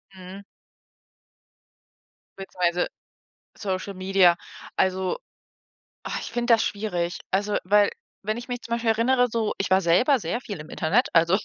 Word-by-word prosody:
Mhm. 185 +2 -10 2.0
Beziehungsweise 180 -2 0 0.7
Social 195 0 -3
Media. 185 -2 +4 0.4
Also, 190 0 +1 0.9
ah, - - -3
ich - - -7
finde 240 0 +2
das 225 - +4
schwierig. 180 -5 -2
Also, 205 +2 +1
weil 205 +2 +4 0.4
wenn 215 +2 -1
ich 240 - -8
mich 245 -1 -4
zum 235 - -5
Beispiel 235 -1 -1
erinnere 245 +3 +3
so: 225 -1 -1
ich 195 - -2
war 190 +1 +4
selber 245 - +3
sehr 215 +8 -3
viel 200 -8 -7
im 155 - -10
Internet, 200 +11 +1
also, 170 +3 +4
195 Hz, 140 wpm, -25 LUFS, 180-230 Hz, 2.0 s, Media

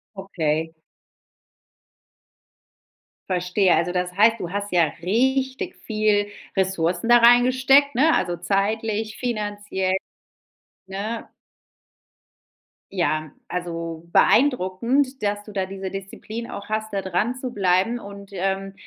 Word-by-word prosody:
Okay. 160 -5 -2 2.6
Verstehe. 180 +1 +2
Also, 170 +2 0
das 180 0 -1
heißt, 225 +2 +5
du 170 - -4
hast 205 0 -3
ja 175 -2 +4 0.2
richtig 265 - 0
viel 215 -2 +1 0.3
Ressourcen 185 +2 0
da 240 - +8
reingesteckt, 255 +4 +5
ne? 305 +7 +4
Also, 175 -1 -1
zeitlich, 215 +3 -1
finanziell, 205 -5 -2 0.9
ne? 205 +4 -5 1.6
Ja. 155 -4 0 0.2
Also, 170 -2 -5
beeindruckend, 255 +3 +2
dass 205 0 -1
du 210 - -11
da 190 -2 -1
diese 190 0 -6
Disziplin 210 +4 -7
auch 200 +1 -8
hast, 215 0 -2
da 195 - 0
dranzubleiben 210 +1 0
und, 200 -2 -10
ähm, 195 +1 -2
200 Hz, 100 wpm, -23 LUFS, 185-230 Hz, 2.6 s, da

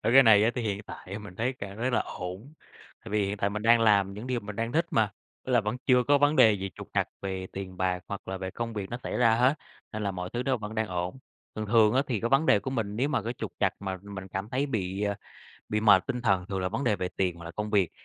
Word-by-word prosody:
Ơ, - - +1
cái 135 +1 +9
này 110 -3 +7
á, 115 - +4
thì 125 - -2
hiện 100 -1 -2
tại 100 0 -8
mình 100 -4 -11
thấy 125 +4 0
cảm 100 -5 -8
thấy 125 +2 0
là 120 - +2
ổn. 95 +11 -6 0.5
Tại 110 - -8
vì 105 -2 +2
hiện 100 +1 -2
tại 100 0 0
mình 105 +1 -4
đang 115 0 +5
làm 100 -3 +4
những 110 +5 -7
điều 125 -2 -1
mình 100 0 -8
đang 115 +1 -2
thích 165 +2 +2
mà! 110 -3 +2 0.4
Tức 130 - -1
là 120 - +5
vẫn 105 +4 -2
chưa 125 -2 +5
có 145 +2 +4
vấn 145 +2 +3
đề 110 - +7
gì 95 -1 -3
trục - - -10
trặc - - +1
về 95 -1 -3
tiền 95 -1 -6
bạc 90 -1 0
hoặc 100 -2 -6
là 95 - -3
về 95 0 -4
công 115 +3 -4
việc 100 -1 -5
nó 120 - -3
xảy - - -3
ra 115 -2 +5
hết, 125 +5 +4 0.4
nên 110 0 -4
là 100 - 0
mọi 90 -1 -5
thứ 120 +1 -1
nó 130 -1 +1
vẫn 110 0 -7
đang 110 -1 0
ổn. 90 +6 -3 0.4
Thường 110 0 -3
thường 110 0 +5
á, 135 - +4
thì 115 -6 -1
cái 115 - 0
vấn 135 +5 +3
đề 105 - +6
của 130 - -5
mình 110 -5 -2
nếu 135 +4 +1
mà 115 - 0
cái 115 +3 -3
trục - - -5
trặc - - +3
mà 95 -1 -3
mình 100 -2 -8
cảm 95 +3 -4
thấy 135 +4 0
bị, 100 -5 -2
à, 100 -1 0 0.5
bị 105 0 0
mệt 100 -4 +5
tinh 125 -1 -3
thần 95 -5 +2
thường 95 -2 -3
là 95 - 0
vấn 115 +8 -3
đề 105 -4 +2
về 90 0 -2
tiền 90 -3 0
hoặc 85 - -11
là 85 - -6
công 105 +4 -4
việc. 100 -5 +3
105 Hz, 300 wpm, -28 LUFS, 95-120 Hz, 0.5 s, cái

